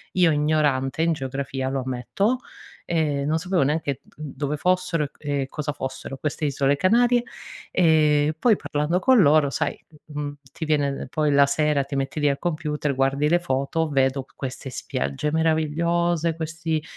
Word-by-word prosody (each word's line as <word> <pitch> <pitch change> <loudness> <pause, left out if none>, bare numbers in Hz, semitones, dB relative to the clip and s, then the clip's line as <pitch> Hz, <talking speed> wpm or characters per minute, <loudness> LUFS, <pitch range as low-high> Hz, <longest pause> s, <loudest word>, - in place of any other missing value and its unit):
Io, 180 -2 +5
ignorante 150 -1 +1
in 165 -1 +2
geografia, 135 -1 -3
lo 135 -1 -2
ammetto, 130 - -1 0.5
ehm, 150 -4 0
non 155 +2 +2
sapevo 180 +1 0
neanche 145 -2 -1
dove 150 0 -4
fossero 180 -2 +1
e 140 - -8
c - - -51
e 140 -2 -1
cosa 150 +1 -4
fossero 135 0 -6
queste 150 +1 -4
isole 140 0 +1
Canarie, 240 - +3 0.5
ehm, 155 -3 +3
poi 220 +2 +3
parlando 150 +5 -1
con 255 0 +5
loro, 145 -2 +5
sai, - - -2 0.3
mhmm, 145 -1 -4 0.2
ti 160 - -5
viene 145 -3 0
poi 150 0 +1
la 140 0 +6
sera 140 -1 +1
ti 140 - -6
metti 135 +2 -2
lì 150 - +2
al 140 - -1
computer, 150 -4 -2
guardi 135 +3 +1
le 175 - +4
foto, 160 0 -1
vedo 135 -1 +1
queste 130 0 -6
spiagge 70 - -3
meravigliose, 165 +1 +1
questi, 160 -1 -3
150 Hz, 160 wpm, -24 LUFS, 140-165 Hz, 0.5 s, la